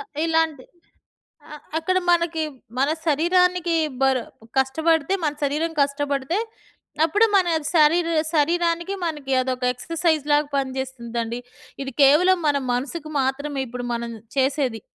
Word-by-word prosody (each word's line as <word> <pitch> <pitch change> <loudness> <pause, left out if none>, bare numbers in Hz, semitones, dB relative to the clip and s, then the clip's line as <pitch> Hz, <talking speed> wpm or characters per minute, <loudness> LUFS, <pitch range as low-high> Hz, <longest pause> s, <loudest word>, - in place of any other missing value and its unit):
అ - - -4 0.2
ఇలాంటి 320 -4 0 0.9
అ - - -6 0.2
అక్కడ 370 +3 +1
మనకి 335 -2 +1 0.4
మన 275 - +2 0.2
శరీరానికి 350 +3 +2 0.3
బరు 265 -2 +3 0.4
కష్టబడితే 320 +5 +1
మన 300 - +1
శరీరం 300 +4 0
కష్టపడితే, 280 +3 -1 0.7
అప్పుడు 415 +8 +4
మన 370 -2 +3 0.3
శరీరు 335 +2 +4 0.2
శరీరానికి 340 +4 +1
మనకి 295 -5 -3
అదొక 255 0 -2
ఎక్సర్‌సైజ్‌లాగా 300 0 0
పనిజేస్తుందండి. 250 -3 -3 0.4
ఇది 270 0 -5
కేవలం 350 +7 +5
మన 290 - +2 0.2
మనసుకు 290 +5 -3
మాత్రమే 275 +2 -2
ఇప్పుడు 245 +1 -6
మనం 235 0 -4 0.3
చేసేది. 265 -4 0
295 Hz, 110 wpm, -23 LUFS, 265-335 Hz, 0.9 s, కేవలం